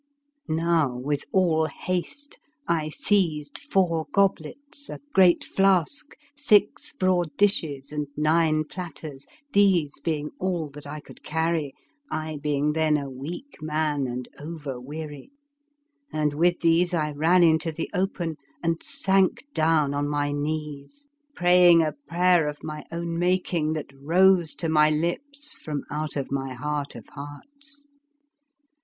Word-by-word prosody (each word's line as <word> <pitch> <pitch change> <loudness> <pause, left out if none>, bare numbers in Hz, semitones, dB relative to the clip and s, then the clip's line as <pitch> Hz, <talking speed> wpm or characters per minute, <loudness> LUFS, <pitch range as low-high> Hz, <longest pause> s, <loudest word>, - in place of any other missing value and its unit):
Now, 160 -5 +1
with 145 +3 -2
all 165 -4 +3
haste 185 - -4 0.3
I 160 -2 0
seized 155 -5 0
four 165 -5 +2
goblets, 200 - -1
a - - -6
great 185 -2 +5
flask, 195 - +1 0.2
six 220 -8 +3
broad 180 -4 0
dishes, 155 -9 +1
and 150 -1 -3
nine 155 0 +3
plat 175 +2 -7
ters, 140 -3 -9 0.3
these 185 -9 +3
being 150 0 -2
all 175 -5 -2
that 145 0 -10
I 150 +1 -6
could - - -15
carry, 160 -2 -1 0.3
I 155 -1 -4
being 150 0 0
then 155 -1 +2
a 140 -2 -5
weak 165 - -8
man 155 -3 0
and 125 0 -5
over 145 -5 -6
weary; 150 - -8 0.8
and 150 -1 0
with 175 +4 +2
these 170 +1 +3
I 150 -2 0
ran 165 +5 +4
into 160 0 +3
the 165 +1 -4
open 180 -4 -2 0.3
and 165 0 0
sank 195 -5 +1
down 155 -3 +2
on 145 0 -1
my 145 0 0
knees, 150 - -4 0.3
praying 175 -1 +6
a 155 -1 -1
prayer 175 -2 +3
of 150 0 -6
my 150 -1 -6
own 170 0 -3
making 175 -3 +1
that 150 -3 -6
rose 170 +4 +3
to 165 - -2
my 155 -1 +4
lips 285 - -1
from 150 -2 -4
out 150 +1 -3 0.2
my 135 -1 -3
heart 145 +2 -3
of - - -10
hearts. 280 - -11
160 Hz, 135 wpm, -25 LUFS, 150-180 Hz, 0.8 s, praying